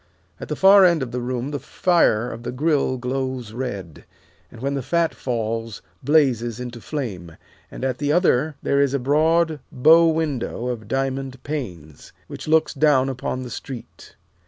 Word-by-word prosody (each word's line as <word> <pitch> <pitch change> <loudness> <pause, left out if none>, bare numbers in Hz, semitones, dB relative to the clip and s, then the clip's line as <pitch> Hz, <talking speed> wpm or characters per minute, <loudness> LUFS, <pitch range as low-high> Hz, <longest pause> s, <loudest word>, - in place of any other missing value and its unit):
At - - -7
the - - -3
far 195 +1 +7
end 170 -6 +4
of 120 - -6
the 125 0 -3
room 125 +2 -3
the 145 - -3
fire 125 -6 +2
of 115 - -8
the 120 - -5
grill 140 -1 +1
glows 130 -2 -3
red, 100 - -6 0.5
and, 115 - -12
when 140 +3 -2
the 140 - -2
fat 165 +5 0
falls, 115 -2 -3 0.2
blazes 125 -5 +2
into 120 -1 -7
flame, 100 - -5 0.3
and - - -6
at 130 -2 -2
the 145 0 0
other 155 -3 +2
there 140 0 +2
is 140 -1 +1
a - - +3
broad 155 +4 +2
bow 160 +6 +6
window 150 -6 -1
of 110 -4 -5
diamond 135 +1 -3
panes, 90 - -7
which - - -9
looks 160 0 +3
down 135 -2 +3
upon 130 0 -4
the 125 - -8
street. 125 +2 -9
130 Hz, 170 wpm, -22 LUFS, 120-150 Hz, 0.5 s, far